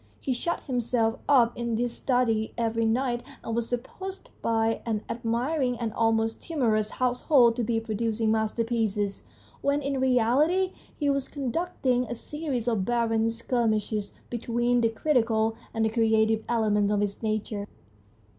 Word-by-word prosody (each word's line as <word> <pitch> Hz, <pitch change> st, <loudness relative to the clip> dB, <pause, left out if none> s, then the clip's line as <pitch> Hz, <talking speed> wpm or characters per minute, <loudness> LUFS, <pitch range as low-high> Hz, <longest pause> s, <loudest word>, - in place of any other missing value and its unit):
He 265 Hz, -, -1 dB
shut 340 Hz, +8 st, -2 dB
himself 240 Hz, -3 st, 0 dB
up 240 Hz, -4 st, +5 dB
in 235 Hz, -1 st, -2 dB
his 240 Hz, 0 st, -1 dB
study 235 Hz, -4 st, 0 dB
every 230 Hz, -1 st, 0 dB
night, 240 Hz, +1 st, +1 dB, 0.2 s
and 225 Hz, -, -3 dB
was 235 Hz, -1 st, -1 dB
supposed 380 Hz, -, -6 dB
by 225 Hz, 0 st, +1 dB
an 220 Hz, -2 st, -2 dB
admiring 245 Hz, +3 st, -1 dB
and 225 Hz, -2 st, -3 dB
almost 225 Hz, 0 st, +1 dB
timorous 225 Hz, -9 st, 0 dB
household 250 Hz, 0 st, +3 dB
to 240 Hz, -, 0 dB
be 225 Hz, 0 st, +1 dB
producing 225 Hz, 0 st, -1 dB
masterpieces, 220 Hz, -2 st, 0 dB, 0.4 s
when 280 Hz, +1 st, +2 dB
in 275 Hz, -1 st, -1 dB
reality 265 Hz, +9 st, +3 dB, 0.2 s
he 290 Hz, -, -1 dB
was 275 Hz, -1 st, -1 dB
conduct 285 Hz, +4 st, -4 dB
ing 250 Hz, -1 st, +3 dB
a 240 Hz, -, -5 dB
series 275 Hz, -2 st, -4 dB
of 225 Hz, -5 st, +1 dB
barren 225 Hz, 0 st, +1 dB
skirmishes 220 Hz, -3 st, -1 dB, 0.2 s
between 240 Hz, +1 st, +1 dB
the 230 Hz, -, +3 dB
critical 225 Hz, -3 st, +1 dB, 0.2 s
and 225 Hz, 0 st, 0 dB
the -, -, +2 dB
creative 220 Hz, -1 st, +2 dB
elements 210 Hz, -3 st, +2 dB
of 205 Hz, -1 st, +2 dB
his 205 Hz, -1 st, -2 dB
nature. 215 Hz, -2 st, -2 dB
230 Hz, 145 wpm, -27 LUFS, 220-250 Hz, 0.4 s, up